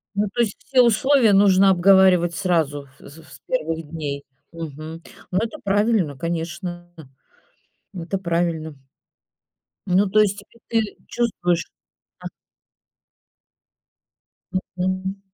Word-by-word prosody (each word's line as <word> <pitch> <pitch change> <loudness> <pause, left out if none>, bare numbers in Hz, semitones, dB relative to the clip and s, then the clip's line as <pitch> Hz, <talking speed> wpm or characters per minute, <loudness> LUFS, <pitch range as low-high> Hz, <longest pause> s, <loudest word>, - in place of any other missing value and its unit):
Ну, 205 +1 +1
то 240 - +1
есть 215 -4 0
все 260 -2 +4
условия 235 0 +4
нужно 195 -1 +5
обговаривать 185 -2 +5
сразу, 160 -6 0
в - - -14
с 140 - -13
с - - -16
первых 165 -10 -2
дней. 145 -3 -5 0.3
Мгм. 160 0 -8 0.3
Ну, 185 - 0
это 230 +8 -4
правильно, 200 - +1
конечно. 175 +2 -5 1.1
Это 180 +2 -4
правильно. 170 -3 -2 1.1
Ну, 190 +3 +3
то 215 - +3
есть 205 -1 +1
теперь 230 -1 -2
ты 205 - -8
чувствуешь? 180 -8 0 0.6
А - - -6 2.5
Мгм. 185 +2 -2
185 Hz, 110 wpm, -22 LUFS, 165-205 Hz, 2.5 s, нужно